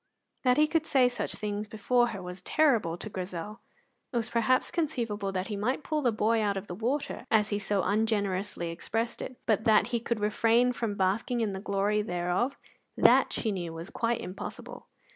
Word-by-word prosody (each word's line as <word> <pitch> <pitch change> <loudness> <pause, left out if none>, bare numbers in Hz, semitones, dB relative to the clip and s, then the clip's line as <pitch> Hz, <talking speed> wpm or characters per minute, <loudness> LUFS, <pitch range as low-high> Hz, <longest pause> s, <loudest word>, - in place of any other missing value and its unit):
That 250 -1 +3
he 305 - +6
could 320 0 0
say 260 -2 +5
such 245 - -3
things 210 0 -3
before 240 +3 +2
her 195 -5 -6
was 180 +1 -7
terrible 230 - +2
to 215 - -7
Grizel. 185 +1 -6 0.5
It 245 - -1
was 225 -1 -2
perhaps 245 +3 +2
conceivable 230 - -1
that 185 -1 -2
he 210 - -2
might 245 +9 -1
pull 310 -1 -1
the 245 -4 +2
boy 220 +1 +2
out 200 -2 0
of 195 - -5
the 180 - -7
water, 245 +9 -2
as 210 -2 +3
he 205 - -1
so 200 -1 0
ungenerously 200 -4 0
expressed 225 +7 -3
it; 255 - -6
but 220 -1 +1
that 215 -1 +5
he 235 - +2
could 235 -1 -2
refrain 230 +4 +3
from 225 -4 -2
basking 210 +6 0
in 210 -3 0
the 190 - -4
glory 200 +1 0
thereof, 180 +7 -1 0.4
that, - - +5
she 220 - -1
knew, 175 -4 -4
was 165 +2 -8
quite 230 0 0
impossible. 185 +2 -8
215 Hz, 195 wpm, -29 LUFS, 195-240 Hz, 0.5 s, he